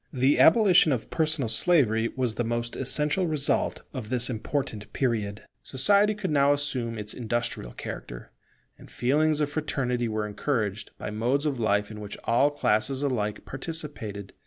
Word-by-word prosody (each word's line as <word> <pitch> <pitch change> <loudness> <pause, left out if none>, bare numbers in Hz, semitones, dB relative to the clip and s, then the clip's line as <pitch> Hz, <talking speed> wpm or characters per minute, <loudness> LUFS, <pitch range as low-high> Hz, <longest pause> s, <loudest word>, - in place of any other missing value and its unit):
The 130 +2 +2
abolition 180 -4 +6
of 125 -5 -2
personal 155 -5 +1
slavery 115 - +3
was 125 -3 0
the 120 - -2
most 120 0 -2
essential 150 +7 +1
result 150 -3 0
of 125 -6 -6
this 125 0 +2
important 110 -2 -4
period. 110 -6 -1 0.2
Society 200 +10 +3
could 200 -5 -3
now 140 -1 +4
assume 130 -5 -2
its 105 0 -5
industrial 120 - -3
character; - - -8 0.5
and - - -14
feelings 150 +4 +1
of 145 -1 0
fraternity 125 -5 -1
were 110 -1 -2
encouraged 105 -2 -2
by - - -5
modes 125 +7 0
of 140 -4 -1
life 105 -1 +1
in 105 - -8
which 105 -1 -7
all 130 +5 +3
classes 135 -1 0
alike 105 -7 -2
participated. 135 - -5
125 Hz, 155 wpm, -26 LUFS, 110-145 Hz, 0.5 s, abolition